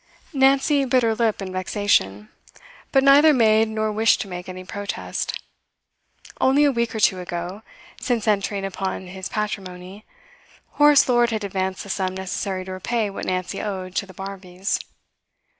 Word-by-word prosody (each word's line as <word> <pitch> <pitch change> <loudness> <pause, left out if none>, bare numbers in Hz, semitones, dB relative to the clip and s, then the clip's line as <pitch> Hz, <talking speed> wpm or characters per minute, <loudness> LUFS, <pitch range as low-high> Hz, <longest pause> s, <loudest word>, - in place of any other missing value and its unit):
Nancy 275 +1 +3
bit 255 -1 +2
her 225 -1 +2
lip 220 -3 0
in 185 - -6
vexation, 185 - 0 0.6
but 270 -1 +4
neither 290 +2 +7
made 220 -2 +4
nor 215 0 -1
wished 220 +1 +3
to - - -5
make 180 -1 -7
any 185 0 -7
protest. 200 +2 -4 1.0
Only 275 +3 +4
a 285 - +4
week 235 -2 -1
or - - -2
two 195 -4 +3
ago, 175 +3 -5 0.4
since 235 -4 -1
entering 200 -1 0
upon 190 -1 -4
his 190 +1 -7
patrimony, 195 -2 -5 0.7
Horace 295 -1 +5
Lord 240 -2 +3
had 220 -2 -2
advanced 190 -1 -3
the 200 - -11
sum 185 -1 -2
necessary 190 0 -4
to 190 - -7
repay 210 +3 -2
what 195 - -6
Nancy 185 -1 -2
owed 185 -3 -5
to 200 - -1
the 185 - -13
Barmbys. 190 0 -4
200 Hz, 160 wpm, -22 LUFS, 185-230 Hz, 1.0 s, neither